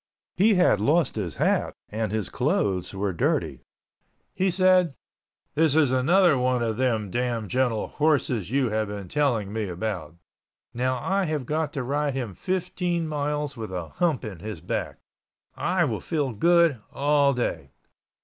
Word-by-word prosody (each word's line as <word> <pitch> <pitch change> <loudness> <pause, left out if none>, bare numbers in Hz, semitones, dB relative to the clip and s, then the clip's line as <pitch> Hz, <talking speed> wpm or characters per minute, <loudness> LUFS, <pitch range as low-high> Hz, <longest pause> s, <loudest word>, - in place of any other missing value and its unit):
He 205 +3 +4
had 180 - +4
lost 155 +8 +2
his 90 -10 -3
hat - - +1
and 110 0 -2
his 110 -3 -1
clothes 95 -3 0
were 95 0 -2
dirty. 85 - -1 0.7
He 190 +1 +1
said, 185 -4 +3 0.6
"This 155 -2 +3
is 150 -5 +4
another 155 +4 +4
one 125 -1 +1
of 110 -2 -1
them 115 -6 0
damn 120 -2 -1
gentle 125 -1 0
horses 135 - +1
you 130 -1 +1
have 110 0 0
been 100 -2 -6
telling 120 -9 0
me 110 -1 -1
about. 90 -4 -4 0.6
Now 130 +2 0
I 190 +9 0
have 155 -5 -2
got 155 +1 -1
to 140 -4 -2
ride 145 +2 -1
him 120 -7 -3
fifteen 180 - -2
miles 150 -1 -2
with 110 -4 -6
a 90 -4 -5
hump 160 - 0
in 100 -6 -7
his 105 -2 -6
back. - - -3 0.6
I 180 -1 +1
will 115 -7 -2
feel 145 -7 -1
good 170 0 +3
all 140 -1 +2
day." 125 - -2
130 Hz, 160 wpm, -25 LUFS, 110-155 Hz, 0.7 s, He